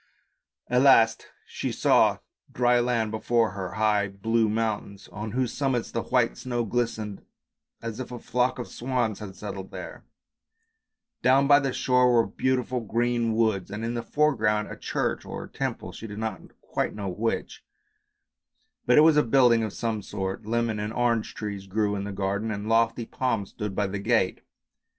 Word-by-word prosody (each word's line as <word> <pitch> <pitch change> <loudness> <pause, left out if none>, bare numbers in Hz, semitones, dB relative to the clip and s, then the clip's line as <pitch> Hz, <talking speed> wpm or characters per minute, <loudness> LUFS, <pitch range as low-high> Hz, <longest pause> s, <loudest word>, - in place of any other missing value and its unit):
At 125 +1 +3
last 115 -5 +5 0.2
she - - -4
saw - - +4 0.3
dry 120 0 +3
land 120 -3 0
before 115 0 +1
her, 95 -1 -5
high 105 -1 +2
blue 110 +3 0
mountains 105 -2 -2
on 105 +1 -6
whose 125 -2 0
summits 135 -4 -1
the 115 - -1
white 125 -2 +1
snow 120 -2 -2
glistened 110 -3 -2 0.6
as 115 0 -5
if 130 - -6
a 125 - -5
flock 125 +2 0
of 125 - -5
swans 120 -4 -2
had 100 -3 -8
settled 95 -1 -7
there; - - -8 1.2
down 135 +2 +4
by 140 0 +7
the 135 -2 -1
shore 125 0 +3
were 115 -1 +4
beautiful 130 -1 -1
green 115 0 0
woods, 110 -5 +1
and 105 +3 -4
in 115 - -2
the 120 - -2
foreground 115 -8 +1
a - - -6
church - - -2
or - - -6
temple, - - -4
she 115 - -8
did 105 -1 -8
not 110 0 -3 0.2
quite - - -2
know 100 -2 -4
which, 110 +6 -3 1.2
but - - +5
it - - +9
was 155 -1 +6
a - - +7
building 120 -1 +4
of 110 -2 -2
some 110 -1 -2
sort. 95 +1 -5
Lemon 115 -1 0
and 105 +1 -3
orange 120 -2 0
trees 100 -2 -5
grew 105 +1 0
in 100 0 -3
the 105 - -4
garden 100 +2 -2
and 105 0 -4
lofty 115 +1 +2
palms 115 -5 -2
stood 105 -2 -5
by 105 - +1
the 100 +1 -3
gate. 110 -3 +1
115 Hz, 175 wpm, -26 LUFS, 105-120 Hz, 1.2 s, it